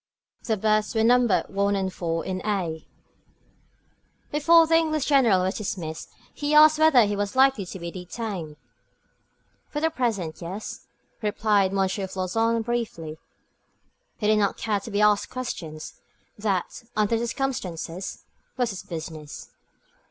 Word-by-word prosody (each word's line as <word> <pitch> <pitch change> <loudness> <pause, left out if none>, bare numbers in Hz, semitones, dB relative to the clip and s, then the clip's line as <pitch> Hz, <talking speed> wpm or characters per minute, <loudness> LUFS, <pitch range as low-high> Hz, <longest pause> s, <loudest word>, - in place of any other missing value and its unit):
Their 220 -2 0
berths 215 +2 +1
were 220 - +3
numbered 240 -2 +3
1 200 +1 +1
and 190 -1 -2
4 165 -1 -2
in 185 -1 -3
a. 180 -7 -2 1.4
Before 330 +3 +6
the 325 - -1
English 310 -3 +2
General 235 -10 +4
was 190 +3 -1
dismissed, 170 -6 -5 0.2
he 295 +1 -1
asked 310 0 +7
whether 300 -7 +6
he 205 0 -1
was 205 +2 -2
likely 260 -7 +4
to 190 - -7
be 170 -1 -6
detained. 180 -3 -6 1.1
"For 295 - -3
the 320 +1 +1
present, 215 - -2
yes," 185 +5 -7 0.3
replied 210 -2 +2
M. 195 - -3
Floçon, 195 +4 0
briefly. 190 -10 -3 1.0
He 210 - -4
did 215 0 +4
not 200 -1 +1
care 210 -2 0
to 200 - -9
be 205 -1 0
asked 210 -1 +3
questions. 165 -11 -6 0.3
That, 200 -2 -2
under 215 +2 +2
the 235 - -2
circumstances, 190 - -4 0.3
was 245 -3 +1
his 195 - -6
business. 160 -3 -8
210 Hz, 140 wpm, -25 LUFS, 185-240 Hz, 1.4 s, asked